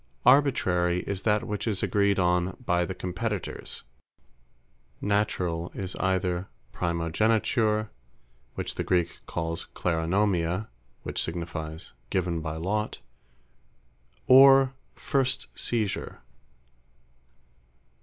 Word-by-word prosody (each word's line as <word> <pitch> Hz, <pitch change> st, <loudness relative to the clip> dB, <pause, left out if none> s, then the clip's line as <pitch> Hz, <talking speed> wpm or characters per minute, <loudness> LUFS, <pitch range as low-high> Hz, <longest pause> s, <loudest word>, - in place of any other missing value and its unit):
Arbitrary, 90 Hz, -10 st, +4 dB
is 100 Hz, -1 st, -4 dB
that 105 Hz, -1 st, +2 dB
which 105 Hz, +2 st, -3 dB
is 105 Hz, -4 st, -1 dB
agreed 100 Hz, -1 st, +2 dB
on 90 Hz, 0 st, +1 dB
by 90 Hz, -2 st, +2 dB
the 95 Hz, -, -5 dB
Competitors; 100 Hz, +2 st, -4 dB, 1.2 s
Naturall, 90 Hz, -5 st, 0 dB
is 95 Hz, -2 st, -4 dB
either 95 Hz, -1 st, 0 dB, 0.2 s
Primogeniture, 105 Hz, -, +1 dB, 0.6 s
(which -, -, -3 dB
the -, -, -3 dB
Greek 90 Hz, -2 st, 0 dB
calls 85 Hz, -1 st, -3 dB
Kleronomia, 90 Hz, +2 st, 0 dB, 0.3 s
which -, -, -2 dB
signifies, 80 Hz, -1 st, -5 dB, 0.2 s
Given 90 Hz, -3 st, 0 dB
by 80 Hz, 0 st, -4 dB
Lot;) 105 Hz, +6 st, -2 dB, 1.3 s
or 135 Hz, 0 st, +8 dB, 0.2 s
First 135 Hz, -2 st, -1 dB
Seisure. 110 Hz, -4 st, -2 dB
95 Hz, 90 wpm, -27 LUFS, 85-105 Hz, 1.3 s, or